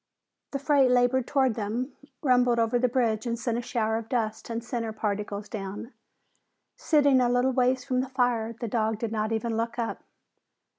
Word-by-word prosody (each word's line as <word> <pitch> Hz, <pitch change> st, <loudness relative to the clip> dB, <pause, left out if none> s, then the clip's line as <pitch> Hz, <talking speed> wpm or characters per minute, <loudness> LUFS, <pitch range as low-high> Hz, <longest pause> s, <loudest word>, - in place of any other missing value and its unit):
The 275 Hz, -, -3 dB
freight 280 Hz, -2 st, +3 dB
labored 250 Hz, 0 st, +3 dB
toward 265 Hz, -4 st, +2 dB
them, 230 Hz, +5 st, -3 dB, 0.3 s
rumbled 250 Hz, -3 st, +4 dB
over 230 Hz, +1 st, +2 dB
the 250 Hz, -, +3 dB
bridge 235 Hz, -2 st, 0 dB
and 235 Hz, 0 st, -1 dB
sent 235 Hz, 0 st, -1 dB
a -, -, -3 dB
shower 225 Hz, -2 st, -1 dB
of 225 Hz, -1 st, -7 dB
dust 220 Hz, -3 st, -2 dB
and 230 Hz, 0 st, -3 dB
cinder 235 Hz, -2 st, -3 dB
particles 210 Hz, -1 st, -3 dB
down. 205 Hz, +4 st, -6 dB, 0.8 s
Sitting 285 Hz, -4 st, +3 dB
a 245 Hz, -, +3 dB
little 245 Hz, +2 st, +2 dB
ways 255 Hz, 0 st, +2 dB
from 255 Hz, -2 st, +1 dB
the 260 Hz, -, -5 dB
fire, 245 Hz, -4 st, 0 dB
the 235 Hz, -, -3 dB
dog 220 Hz, 0 st, 0 dB
did 225 Hz, 0 st, -3 dB
not 215 Hz, 0 st, -1 dB
even 225 Hz, 0 st, -1 dB
look 230 Hz, +1 st, -2 dB
up. 235 Hz, -1 st, -3 dB
235 Hz, 185 wpm, -27 LUFS, 220-255 Hz, 0.8 s, rumbled